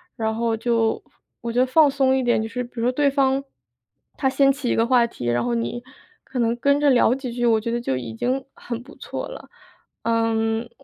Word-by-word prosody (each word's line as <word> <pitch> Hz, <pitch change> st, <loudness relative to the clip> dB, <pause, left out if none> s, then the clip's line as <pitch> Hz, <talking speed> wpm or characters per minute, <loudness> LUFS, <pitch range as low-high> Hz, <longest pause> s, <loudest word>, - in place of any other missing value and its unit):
然 220 Hz, -1 st, -1 dB
后 230 Hz, -1 st, 0 dB
就 230 Hz, -1 st, 0 dB, 0.4 s
我 235 Hz, -, -3 dB
觉 245 Hz, -, 0 dB
得 255 Hz, -, +5 dB
放 295 Hz, +3 st, +5 dB
松 270 Hz, -1 st, +2 dB
一 265 Hz, -, +1 dB
点。 240 Hz, -3 st, +2 dB
就 220 Hz, -, -3 dB
是 250 Hz, +2 st, -4 dB
比 240 Hz, -, -13 dB
如 -, -, -1 dB
说 250 Hz, -, +3 dB
对 285 Hz, +2 st, +2 dB
方， 270 Hz, -1 st, +1 dB, 0.7 s
他 265 Hz, -, +1 dB
掀 275 Hz, +1 st, +4 dB
起 275 Hz, -3 st, -3 dB
一 -, -, +2 dB
个 225 Hz, -, +3 dB
话 240 Hz, -1 st, +4 dB
题， 125 Hz, -, -8 dB
然 120 Hz, 0 st, +1 dB
后 120 Hz, -1 st, -1 dB
你 120 Hz, -, -3 dB, 0.4 s
可 265 Hz, -, -8 dB
能 235 Hz, 0 st, +1 dB
跟 280 Hz, +3 st, +2 dB
着 290 Hz, -2 st, +4 dB
聊 245 Hz, 0 st, +4 dB
几 265 Hz, -3 st, -5 dB
句， 240 Hz, 0 st, 0 dB
我 225 Hz, -1 st, +4 dB
觉 230 Hz, +2 st, -3 dB
得 240 Hz, 0 st, -1 dB
就 130 Hz, -, -1 dB
已 115 Hz, -3 st, -6 dB
经 260 Hz, -, -2 dB
很 240 Hz, -1 st, -6 dB
不 290 Hz, +5 st, -14 dB
错 -, -, -5 dB
了。 -, -, -10 dB, 0.5 s
嗯， 225 Hz, 0 st, 0 dB
240 Hz, 250 characters per minute, -23 LUFS, 225-265 Hz, 0.7 s, 得